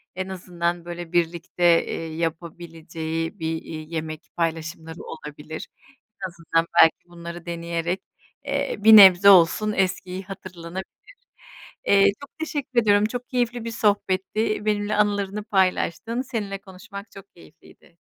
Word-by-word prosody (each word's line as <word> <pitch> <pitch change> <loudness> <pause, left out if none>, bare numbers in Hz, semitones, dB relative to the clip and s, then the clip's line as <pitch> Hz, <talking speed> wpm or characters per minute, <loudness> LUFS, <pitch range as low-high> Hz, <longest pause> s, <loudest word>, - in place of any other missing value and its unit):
en 185 +1 -4
azından, 175 -2 -3
böyle, 175 -1 -7
birlikte, 170 +1 -1 0.2
eee, 165 -1 -5
yapabileceği 165 +1 -4
bir, 160 - -2
iii, 155 0 -9
yemek 155 -1 -4
paylaşımları 165 -1 -3
olabilir. 155 0 -8 0.6
En - - 0
azından 165 -1 -1
belki 165 - +4
bunları 170 0 -9
deneyerek, 170 +1 -3 0.4
eee, 280 0 -1
bir 220 +2 +8
nebze 190 0 +9
olsun 200 +3 +5
eskiyi 185 0 -1
hatırlanabilir. 185 -1 -8 1.0
Eee, 200 0 +6 0.2
çok 280 +3 -13
teşekkür 285 -6 -1
ediyorum, 205 -1 +4
çok 245 +3 -5
keyifli 245 -2 -1
bir 230 - -3
sohbetti, 210 0 0
benimle 210 0 0
anılarını 205 0 0
paylaştın, 195 +4 0
seninle 215 -6 -4
konuşmak 200 +2 -11
çok 195 - -14
keyifliydi. 80 - -19
185 Hz, 125 wpm, -24 LUFS, 165-205 Hz, 1.0 s, nebze